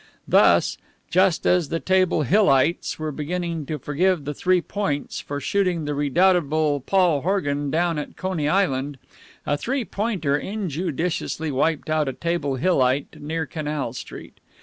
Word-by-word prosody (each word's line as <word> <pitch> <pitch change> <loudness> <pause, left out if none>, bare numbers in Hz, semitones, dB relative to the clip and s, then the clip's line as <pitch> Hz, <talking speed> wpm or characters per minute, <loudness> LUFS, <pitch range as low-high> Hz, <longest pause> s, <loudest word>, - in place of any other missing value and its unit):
Thus, - - +4 0.3
just 185 -1 +3
as 175 -5 +2
the 165 - -1
Table 185 -4 +2
Hillites 160 - +2
were 155 -1 -3
beginning 165 +1 -3
to 155 - -3
forgive 150 +3 0
the 145 - -3
Three 185 +4 +2
Points 175 -6 -3
for 145 0 -5
shooting 180 +1 0
the 145 - -2
redoubtable 155 0 +2
Paul 175 0 +2
Horgan 145 -6 -1
down 165 +1 0
at 150 - -7
Coney 180 -6 -1
Island, 145 -7 0 0.5
a 145 - 0
Three 260 - -2
Pointer 190 -11 -1
injudiciously 170 -4 -3
wiped 150 +3 0
out 155 -2 +1
a - - -4
Table 170 -4 -2
Hillite 130 -3 +1
near 160 +2 -3
Canal 150 -6 -4
Street. - - -10
160 Hz, 145 wpm, -23 LUFS, 145-180 Hz, 0.5 s, Thus